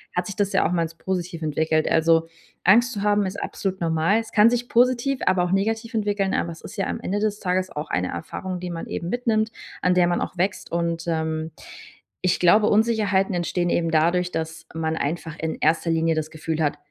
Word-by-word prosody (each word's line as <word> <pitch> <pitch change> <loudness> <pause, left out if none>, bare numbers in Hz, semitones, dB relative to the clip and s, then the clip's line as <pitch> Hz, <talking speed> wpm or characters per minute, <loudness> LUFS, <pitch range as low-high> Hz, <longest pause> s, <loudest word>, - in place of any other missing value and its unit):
hat 180 - 0
sich 200 - -6
das 205 -1 0
ja - - +3
auch - - -3
mal 175 -2 +1
als 165 0 -3
positiv 175 -2 -4
entwickelt. 155 +1 +1
Also, 165 0 +3 0.4
Angst 235 +6 +5
zu 200 - -4
haben 205 -1 +2
ist 190 - -5
absolut 190 -2 -4
normal. 165 +5 +2
Es 225 - -7
kann 215 +2 +6
sich 245 0 -1
positiv, 255 +2 +2
aber 185 -1 +3
auch 180 - -1
negativ 225 +4 0
entwickeln, 205 -3 0
aber 170 - 0
es 165 - -11
ist - - -10
ja 195 - 0
am - - -3
Ende 200 +3 -1
des 210 0 -1
Tages 185 0 0
auch 150 +1 -6
eine 90 0 0
Erfahrung, 180 - -5
die 180 0 -5
man 165 -1 -5
eben 170 - -4
mitnimmt, 225 -1 0 0.3
an 180 0 +4
der 180 -1 +4
man 175 - 0
auch 185 - -4
wächst 190 +2 -1
und, 170 0 -1
ähm, 160 -1 -2 0.7
ich 180 - +2
glaube 210 +5 +5
Unsicherheiten 210 -3 +2
entstehen 175 0 -1
eben 165 -1 +1
dadurch, 175 +3 +2
dass 160 0 -5
man 160 0 -1
einfach 160 +1 -3
in 160 0 -2
1. 165 +1 +2
Linie 165 0 +2
das 155 0 -2
Gefühl 160 0 -3
hat: 145 -1 0
180 Hz, 215 wpm, -23 LUFS, 165-205 Hz, 0.7 s, kann